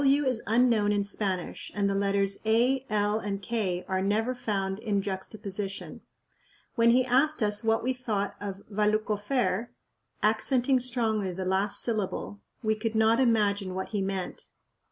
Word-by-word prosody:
"W" 280 +1 +4
is 255 -3 0
unknown 225 -2 +3
in 205 -1 +1
Spanish 195 -3 -3
and 200 -1 +1
the 200 - +1
letters 195 0 +1
"a," 240 +4 +3
"l," 210 0 +1
and 200 -2 -3
"k" 190 -3 -2
are 190 0 0
never 215 +5 +1
found 195 -5 -2
in 215 -3 0
juxtaposition. 195 0 -5 0.7
When 230 -2 +4
he 250 +2 +4
asked 265 +2 +2
us 210 +1 0
what 225 0 +2
we 260 +2 +1
thought 220 -5 -2
of 200 -1 -6
"Valluck 215 +1 +1
ofair'," 210 -1 0 0.6
accenting 250 +4 +2
strongly 225 -6 0
the 185 +1 -4
last 195 +2 0
syllable, 205 -2 -3 0.2
we 220 0 +2
could 220 +1 -3
not 220 +2 +4
imagine 205 -6 +2
what 190 - -3
he 205 -2 -1
meant. 190 -1 -4
210 Hz, 155 wpm, -28 LUFS, 195-235 Hz, 0.7 s, W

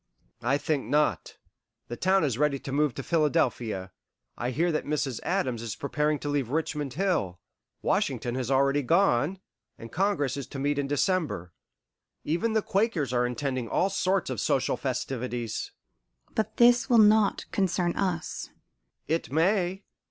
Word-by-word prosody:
"I 130 +4 +2
think 145 -1 -1
not. 150 +1 0 0.5
The 120 - -5
town 190 +7 +2
is 135 -7 +1
now 135 - -4
ready 150 -2 +2
to 135 - -7
move 145 -1 +1
to 135 - -5
Philadelphia. 120 - 0 0.4
I 120 - -2
hear 165 +7 +1
that 155 - -1
Mrs. 145 -5 -1
Adams 150 -12 -1
is 115 -3 -4
preparing 150 +1 0
to - - -4
leave 145 -5 -1
Richmond 150 -2 -2
Hill. 145 - 0 0.4
Washington 120 - 0
has 130 -1 -3
already 140 +1 +3
gone, 165 +1 +2 0.4
and 115 - -10
Congress 160 -8 0
is 140 - -5
to - - -8
meet 145 +1 0
in 140 - -1
December. 145 - -1 0.7
Even 175 +9 0
the 220 -1 +2
Quakers 190 - 0
are 125 0 +2
intending 130 -2 -3
all 195 +2 +1
sorts 190 -5 0
of 120 - -3
social - - +1
festivities." 120 -3 -3 0.6
"But 220 - -2
this 240 +2 +5
will 240 - +5
not 215 -1 +5
concern 180 -3 0
us." 180 -4 -2 0.6
"It 160 -2 -1
may. 185 +4 +1
145 Hz, 155 wpm, -27 LUFS, 130-185 Hz, 0.7 s, this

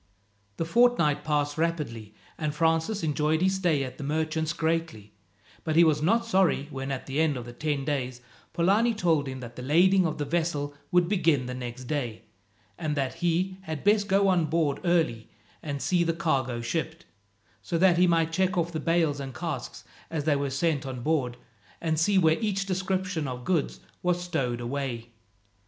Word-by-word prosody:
The 165 - -1
fortnight 195 -7 +3
passed 145 0 0
rapidly, 130 -11 -2 0.2
and 150 -1 -3
Francis 165 +6 +1
enjoyed 155 0 +1
his 190 +2 +2
stay 175 -7 +1
at 130 -1 -7
the - - -5
merchant's 155 +2 -1
greatly, 160 -10 -2 0.5
but 160 -1 -1
he 170 - +7
was 155 -2 +3
not 230 +8 +2
sorry 190 -9 +2
when, 135 0 -4
at 135 - -4
the 135 +2 -2
end 155 -4 +1
of 120 0 -9
ten 145 -3 -1
days, 130 -4 -2 0.3
Polani 210 +7 +2
told 165 -8 +1
him 130 -1 -6
that 120 -1 -9
the - - -7
lading 180 +7 +4
of 155 - -4
the 145 - -2
vessel 150 -2 -1 0.2
would 175 -1 +4
begin 165 -9 +2
the 125 - -4
next 125 0 -6
day, 120 -5 -3 0.6
and 150 -2 -2
that 135 -2 -1
he 180 +2 0
had 160 -5 -6
best 205 0 +3
go 195 +1 +3
on 180 -4 +3
board 155 -2 0
early 160 -11 +1 0.3
and 145 -2 -4
see 180 -2 +2
the 165 0 0
cargo 135 -8 -1
shipped, 160 +6 -3 0.6
so 170 - -2
that 175 0 +4
he 180 - +5
might 165 -1 +2
check 185 +1 +1
off 170 0 0
the 160 - -3
bales 165 -3 +1
and 135 -3 -6
casks - - -5 0.3
as 160 -3 -2
they 150 -1 +2
were 140 0 -1
sent 145 +1 0
on 130 -2 -6
board, 125 -4 0 0.4
and 160 -2 0
see 195 +4 +3
where 160 -3 +4
each 195 -3 0
description 185 -4 -1
of 125 -1 -6
goods 175 -6 0 0.2
was 180 0 +1
stowed 125 -9 -2
away. 120 -2 -4
160 Hz, 185 wpm, -27 LUFS, 140-175 Hz, 0.6 s, he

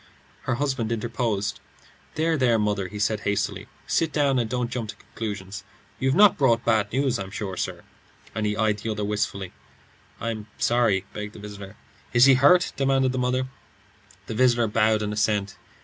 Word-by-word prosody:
Her 130 - 0
husband 130 -4 -1
interposed. 110 -3 -2 0.6
"There, 160 +1 +1
there, 125 -5 +3
mother," 105 -3 0
he 105 - -8
said, 105 +1 0
hastily. 100 0 -2 0.2
"Sit 165 -1 +1
down, 140 -4 +2
and 115 -2 -1
don't 125 0 -2
jump 115 -4 -3
to - - -6
conclusions. 100 -2 -6 0.4
You've 130 +1 +1
not 205 -3 +6
brought 120 -4 +3
bad 110 -3 +2
news, 130 -2 +1
I'm 95 -1 -5
sure, 100 -2 -5
sir;" - - -4 0.5
and 110 -1 -1
he 105 0 -1
eyed 110 -2 +1
the 110 - -4
other 105 -1 -2
wistfully. 100 -3 -2 0.7
"I'm 110 -2 -4
sorry 115 -6 +2
" - - -29
began 105 0 -6
the - - -12
visitor. 100 -1 -9 0.4
"Is 120 +1 +7
he 135 - +7
hurt?" 145 +8 +5
demanded 135 -1 +2
the 130 - -2
mother, 125 +1 +1
wildly. 130 +1 -10 0.7
The - - -5
visitor 120 0 +3
bowed 110 0 +2
in 105 0 -2
assent. 105 -2 0
110 Hz, 180 wpm, -25 LUFS, 105-130 Hz, 0.7 s, Is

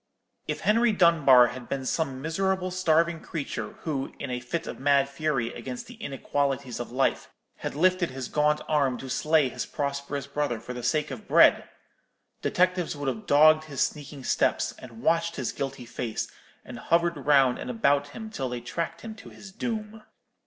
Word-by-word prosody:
If - - -3
Henry 230 +1 +3
Dunbar 150 -10 +6
had 125 -1 -9
been 135 -1 -3
some 135 -3 -2
miserable 185 +3 0
starving 170 -2 +2
creature, 155 -4 -5
who, 140 -4 -3
in - - -5
a 125 - -2
fit 125 +7 -4
of - - -7
mad 140 0 +3
fury 140 -5 -1
against 125 -2 -6
the - - -11
inequalities 135 -2 -2
of 120 - -5
life, 135 +2 0 0.3
had - - -5
lifted 185 +2 +2
his 130 -1 -6
gaunt 150 0 +1
arm 140 -5 +1
to 130 - -7
slay 155 -1 +3
his 125 -3 -5
prosperous 140 0 -3
brother 140 -4 -2
for 125 - -7
the 125 - -6
sake 150 +5 0
of 125 -5 -8
bread—detectives 180 -2 +1
would 145 -2 -2
have 115 -4 -6
dogged 155 +2 +6
his 140 -4 -4
sneaking 145 -2 -8
steps, - - +1
and 115 -2 -12
watched 165 0 +2
his 130 - -2
guilty 135 -3 -5
face, 120 -1 -4 0.4
and - - -8
hovered 170 0 +2
round 135 -4 +5
and - - -6
about 140 +4 +2
him 220 +9 -8
till 135 -11 -3
they 125 0 -4
tracked 165 +8 -4
him 225 -1 -7
to 220 - -13
his 190 - -12
doom. 215 +1 -4
145 Hz, 175 wpm, -27 LUFS, 130-165 Hz, 0.4 s, Dunbar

